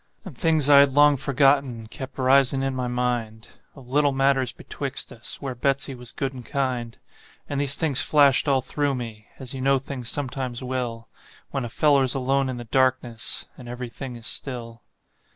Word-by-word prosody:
And 180 -9 -9
things 160 -1 +2
I 145 -1 +8
had 140 -1 +5
long 145 +1 +6
forgotten 135 -3 +1
kept 130 +4 -8
risin' 135 0 +3
in 135 0 -1
my 125 -1 -2
mind, 120 -3 -3 0.3
Of 135 -4 -14
little 145 +2 +2
matters 135 -2 +2
betwixt - - -3
us, - - -5
where 135 -2 -3
Betsey 135 +2 0
was 125 -2 -7
good 135 -1 -3
and 125 -2 -9
kind; 125 -4 -3 0.5
And 145 -1 -2
these 140 -1 +4
things 145 -5 +3
flashed 145 -2 +4
all 135 -2 +3
through 145 +1 -1
me, 115 -4 -7
as 130 -2 -7
you 130 - -5
know 135 +1 +3
things 130 -3 -4
sometimes 130 -3 -3
will 125 -3 -4 0.4
When 135 -3 -2
a - - -5
feller's 140 -1 +3
alone 135 +1 0
in 130 - -4
the 120 - -6
darkness, 130 -2 0
and 120 -2 -10
every 125 0 -6
thing 130 0 -7
is 115 -1 -11
still. 120 -3 -4
130 Hz, 185 wpm, -24 LUFS, 120-140 Hz, 0.5 s, I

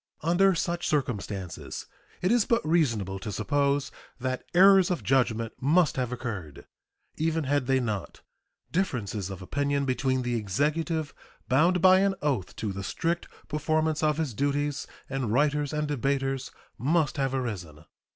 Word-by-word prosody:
Under 180 +3 +4
such 170 +1 -1
circumstances 105 - -3 0.4
it 180 - +3
is 235 -3 +4
but 230 -6 +1
reasonable 115 - +1
to 105 - -5
suppose 140 +6 0 0.3
that 130 0 -2
errors 190 0 +7
of 180 - -1
judgment 115 -4 +1
must 155 +4 +3
have 125 -2 -1
occurred. 100 - -6 0.5
Even 160 0 0
had 140 -2 0
they 135 -1 +3
not, 110 -6 -4 0.5
differences 110 - -1
of 95 -1 -7
opinion 140 +6 0
between 130 0 0
the 120 0 -1
Executive, 150 - -1 0.3
bound 170 +7 +3
by 185 0 +8
an 195 0 +2
oath 130 -11 -1
to 105 -3 -3
the 100 +1 -5
strict 170 - -2 0.2
performance 155 +1 0
of 155 -1 +2
his 155 -6 -1
duties, 145 +3 -1 0.2
and 135 -5 -2
writers 145 +3 +2
and 150 -1 -1
debaters 135 -1 -1 0.3
must 155 +2 +1
have 135 -1 0
arisen. 90 - -5
140 Hz, 145 wpm, -27 LUFS, 120-160 Hz, 0.5 s, by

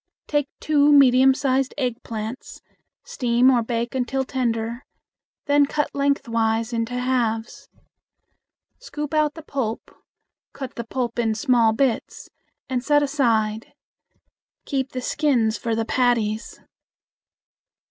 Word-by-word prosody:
Take 290 -2 -1
two 295 -1 +3
medium 265 -2 +6
sized 265 -1 0
eggplants, 230 -2 -5 0.4
steam 245 0 +2
or 245 -2 +3
bake 235 +1 -3
until 265 +1 -1
tender; 235 -1 -2 0.6
then 285 -1 +3
cut 295 0 -2
lengthwise 230 -5 0
into 230 +1 -2
halves. 245 -3 -2 1.1
Scoop 300 - -6
out 305 -1 +1
the 320 - -10
pulp, 250 -7 -4 0.6
cut 265 -2 -7
the 235 - -6
pulp 240 -1 -3
in 225 -2 +1
small 230 0 +3
bits 235 +1 -2 0.4
and 250 -2 -2
set 290 +1 +3
aside. 225 -6 0 0.9
Keep 270 -2 -2
the 255 - -3
skins 250 -6 +1
for 230 -1 -1
the 225 0 -1
patties. 230 -3 0
250 Hz, 115 wpm, -23 LUFS, 230-275 Hz, 1.1 s, medium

